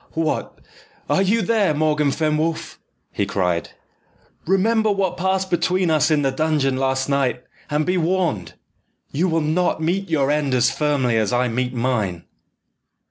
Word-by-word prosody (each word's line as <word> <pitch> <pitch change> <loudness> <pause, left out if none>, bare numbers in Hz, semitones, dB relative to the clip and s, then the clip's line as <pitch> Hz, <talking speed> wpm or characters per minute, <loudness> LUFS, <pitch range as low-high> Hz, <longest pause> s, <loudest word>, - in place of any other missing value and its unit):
"What, 160 -1 -2 0.5
are - - +2
you 210 +3 +2
there, 205 -6 +2
Morgan 150 -1 +1
Fenwolf?" 155 +2 -1 0.3
he - - -2
cried. 90 -3 -1 0.8
"Remember 215 +4 +2
what 195 -2 0
passed 190 +1 -1
between 180 0 +1
us 155 -1 +3
in 150 -2 +2
the 135 - +1
dungeon 145 -2 0
last 130 0 0
night, 135 -3 0 0.3
and 150 +1 0
be 180 +1 +1
warned! 170 - -1 0.6
You 175 +6 0
will 165 0 +1
not 160 +4 0
meet 175 +4 -1
your 145 -3 +1
end 145 -3 0
as 125 -1 +3
firmly 140 -6 +1
as 110 -3 +1
I 125 0 +1
meet 125 +2 -2
mine?" 110 -8 -1
155 Hz, 150 wpm, -21 LUFS, 130-180 Hz, 0.8 s, us